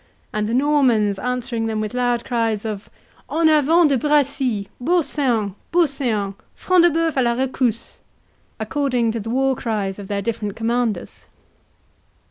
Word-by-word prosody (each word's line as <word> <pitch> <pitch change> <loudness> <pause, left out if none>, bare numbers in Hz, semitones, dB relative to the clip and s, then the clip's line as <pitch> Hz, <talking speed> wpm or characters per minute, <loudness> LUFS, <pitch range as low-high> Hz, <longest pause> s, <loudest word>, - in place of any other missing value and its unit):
and 210 -1 -1
the - - -1
Normans 250 -8 +2
answering 250 -2 -2
them 220 -1 -2
with 215 +2 -3
loud 245 -1 0
cries 225 -3 -1
of 210 -2 -5 0.4
"En 325 0 +3
avant 315 +2 +5
De 270 -3 +2
Bracy!—Beau 280 - +1
seant! 235 -10 -1 0.2
Beau 345 0 +4
seant!—Front 260 - 0
de - - +6
Bœuf 325 -1 0
a - - +4
la 235 -1 +2
rescousse!" 250 -3 -1 0.6
according 255 -6 0
to 230 - -3
the 220 +1 -6
war 265 +2 +1
cries 210 -5 -3
of 200 - -8
their 200 0 -2
different 210 -2 -3
commanders. 230 -1 -2
245 Hz, 145 wpm, -21 LUFS, 215-280 Hz, 0.6 s, de